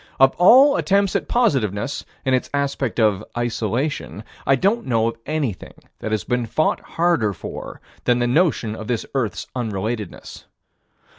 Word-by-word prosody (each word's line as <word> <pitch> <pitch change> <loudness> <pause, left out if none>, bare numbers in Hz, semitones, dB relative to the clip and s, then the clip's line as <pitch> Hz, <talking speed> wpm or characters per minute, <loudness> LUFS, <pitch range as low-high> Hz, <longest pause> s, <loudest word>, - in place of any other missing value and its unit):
Of 135 0 +6
all 265 +10 +7
attempts 200 -1 +1
at - - -1
positiveness, 135 - 0 0.2
in 130 - +2
its 130 - 0
aspect 140 -4 -1
of 105 -4 +2
isolation, 120 +1 -2 0.2
I 135 - +5
don't 200 - 0
know 115 -2 +2
of 115 - -8
anything 145 - -3 0.2
that - - -4
has 110 -3 0
been 125 -1 -1
fought 155 +7 +1
harder 165 -12 0
for - - -8 0.2
than 120 -1 +3
the 120 - +1
notion 125 -5 +1
of 110 -1 -8
this 120 -3 -1
earth's 120 -8 -2
unrelatedness. 110 -2 -4
125 Hz, 150 wpm, -21 LUFS, 110-155 Hz, 0.2 s, all